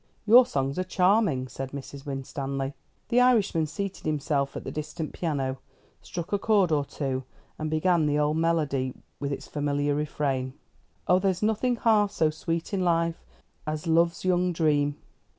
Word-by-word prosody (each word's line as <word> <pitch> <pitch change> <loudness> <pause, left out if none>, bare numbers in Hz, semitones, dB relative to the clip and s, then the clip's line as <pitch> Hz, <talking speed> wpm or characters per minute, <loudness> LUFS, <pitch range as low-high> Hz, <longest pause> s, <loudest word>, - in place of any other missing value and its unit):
"Your 240 +3 +8
songs 135 +3 -1
are - - +1
charming," 185 - +2
said 135 +1 -6
Mrs. 140 +1 -8
Winstanley. 135 0 -3 0.4
The 245 +1 +4
Irishman 210 -10 +3
seated 195 +2 -5
himself 145 -2 0
at - - -6
the - - -5
distant 155 +1 -5
piano, 135 -6 -2 0.4
struck 175 +2 -6
a 205 - +2
chord 200 -5 +3
or 145 -2 +2
two, 135 -2 -3 0.4
and 155 0 -2
began 160 0 +2
the 145 0 +1
old 150 +1 +1
melody, 150 -6 0 0.2
with 140 0 -3
its 140 - -5
familiar 145 0 0
refrain: 140 -3 -1 0.5
Oh, 180 +1 +5
there's 190 0 0
nothing 220 +3 +1
half 215 -3 +3
so 160 -6 +1
sweet 165 +4 -3
in 190 -2 +1
life 170 -1 +1 0.4
As 155 +2 -3
love's 170 +2 +2
young 180 0 +2
dream. 145 -3 +1
155 Hz, 160 wpm, -27 LUFS, 140-185 Hz, 0.5 s, Your